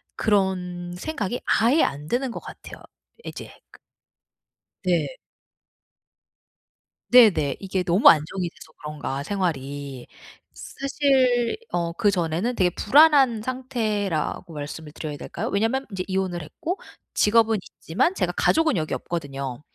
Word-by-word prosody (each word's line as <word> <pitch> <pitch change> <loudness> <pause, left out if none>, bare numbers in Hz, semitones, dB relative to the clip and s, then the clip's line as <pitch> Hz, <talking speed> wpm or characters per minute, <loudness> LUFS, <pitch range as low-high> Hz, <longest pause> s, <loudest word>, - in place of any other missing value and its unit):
그런 180 -4 0
생각이 240 - -3
아예 245 +8 +3
안 145 +2 -2
드는 250 +3 -1
것 - - -6
같아요, - - -11 0.4
이제 - - -8 0.2
그 - - -17 1.0
네. 185 - 0 1.9
네네. 205 - +6
이게 190 -1 -2
너무 180 +4 +6
안정이 170 +4 +2
돼서 155 - -16
그런가, 145 -2 -4
생활이. 145 -8 -3 0.5
사실 265 -4 +1 0.2
어 170 -1 -1
그전에는 185 +2 0
되게 180 -4 +3
불안한 270 - +5
상태라고 215 - -2
말씀을 150 +1 -7
드려야 155 -1 -6
될까요? - - -5
왜냐면 225 +7 0
인제 185 -1 -3
이혼을 185 -2 -2
했고 330 - -5 0.3
직업은 225 0 +3
있지만 265 - -1
제가 - - -1
가족은 320 -6 +3
여기 155 -2 -1
없거든요. 140 -6 -5
190 Hz, 265 characters per minute, -24 LUFS, 160-240 Hz, 1.9 s, 네네